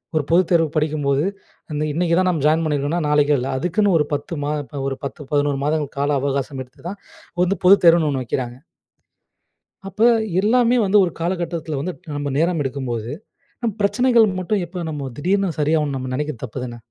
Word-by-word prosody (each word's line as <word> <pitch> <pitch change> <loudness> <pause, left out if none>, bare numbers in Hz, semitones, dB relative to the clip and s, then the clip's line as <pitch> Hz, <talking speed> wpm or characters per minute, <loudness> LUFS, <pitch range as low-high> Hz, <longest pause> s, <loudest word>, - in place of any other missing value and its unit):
ஒரு 155 - +2
பொதுத்தேர்வுக்கு 165 -2 +3
படிக்கும்போது, 145 -2 +1 0.5
அந்த 150 0 -1
இன்னைக்கு 170 +1 +1
தான் 185 - +2
நம்ம 165 -6 -1
ஜாயின் 160 +2 +3
பண்ணியிருக்கோம்னா 150 +3 0
நாளைக்கும் 150 -1 +3
இல்லை, 130 +2 -3
அதுக்குன்னு 180 +4 +2
ஒரு 150 - +2
10 145 +5 -3
மா 145 - -1 0.2
ப 145 -2 -5
ஒரு 135 -1 -3
10, 145 0 -7
11 145 -1 +1
மாதங்கள் 150 -1 -1
கால 140 +1 +1
அவகாசம் 140 0 -2
எடுத்து 130 +1 -22
தான், 200 +1 -8 0.4
வந்து 185 +2 0
பொதுத்தேர்வுன்னு 170 -4 +6
ஒண்ணு 135 -2 -2
வைக்கிறாங்க. 120 0 -3 1.3
அப்ப, 195 +3 -7 0.4
எல்லாமே 240 +3 +3
வந்து 195 +2 +4
ஒரு 175 - -3
காலகட்டத்துல 170 -3 -2
வந்துட்டு, 175 +1 -6
நம்ம 145 0 -2
நேரம் 165 +2 +1
எடுக்கும்போது, 125 -4 -4 0.5
நம் 225 -4 -1
பிரச்சனைகள் 235 +2 +4
மட்டும் 185 +1 -1
எப்படி 175 +1 -6
நம்ம 145 -3 -4
திடீர்னு 195 +5 +1
சரியாகும்னு 150 -1 +1
நம்ம 130 0 -5
நெனைக்கிறது 150 -4 -4
தப்புதான. 125 0 -6
155 Hz, 165 wpm, -21 LUFS, 140-180 Hz, 1.3 s, பொதுத்தேர்வுன்னு